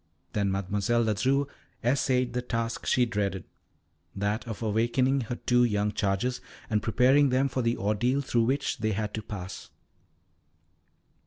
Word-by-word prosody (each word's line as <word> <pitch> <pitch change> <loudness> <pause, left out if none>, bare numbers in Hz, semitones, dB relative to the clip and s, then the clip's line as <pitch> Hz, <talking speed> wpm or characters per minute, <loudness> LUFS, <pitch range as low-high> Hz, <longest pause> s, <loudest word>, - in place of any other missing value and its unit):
Then 100 -2 +1
Mademoiselle 100 +5 0
Ledru 130 +6 +1 0.4
essayed 125 0 +1
the 125 - -1
task 115 -1 -3
she 125 - +4
dreaded 100 -5 -2 0.7
that 105 +4 -2
of 115 0 -5
awaking 120 +5 +2
her 120 - -1
two 120 0 +2
young 105 -3 +1
charges, 105 +6 -1 0.3
and 105 -1 +2
preparing 130 +5 +4
them 130 +2 +2
for 130 -1 -2
the 115 0 0
ordeal 115 +7 +1
through 120 -4 +1
which 135 +1 0
they 110 0 0
had 105 +1 -3
to 110 - -3
pass. 100 -3 -7
115 Hz, 145 wpm, -28 LUFS, 105-125 Hz, 0.7 s, she